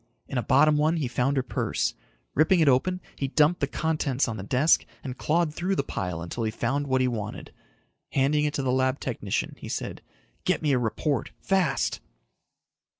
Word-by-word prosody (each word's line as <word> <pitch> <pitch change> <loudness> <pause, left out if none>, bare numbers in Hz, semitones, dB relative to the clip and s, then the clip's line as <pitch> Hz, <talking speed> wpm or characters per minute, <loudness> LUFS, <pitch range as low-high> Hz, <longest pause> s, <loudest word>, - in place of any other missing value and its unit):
In 130 - -1
a - - 0
bottom 150 +4 +4
one 155 +3 +2
he 145 -5 -1
found 125 +3 0
her 130 - +2
purse. 125 - -1 0.4
Ripping 160 +5 +4
it 160 - +4
open, 180 +8 +2
he 135 - -2
dumped 150 +5 +3
the 140 - +1
contents 150 -3 0
on 115 - -3
the 105 - -5
desk 130 +10 +3 0.2
and 130 -2 -5
clawed 160 +2 +1
through 185 +4 -1
the 140 - 0
pile 90 -7 -4
until 100 +7 -4
he 110 - +1
found 135 +6 -1
what 130 -1 +2
he 130 - +3
wanted. 110 -4 -5 0.6
Handing 150 +2 +2
it 150 0 -1
to 140 - -1
the 130 - +1
lab 130 +1 +1
technician, 105 -6 -2
he - - -8
said, - - -4 0.4
"Get - - 0
me 150 - +2
a 130 - +3
report. 125 +4 -1
Fast." 190 -5 +1
135 Hz, 195 wpm, -26 LUFS, 125-155 Hz, 0.6 s, bottom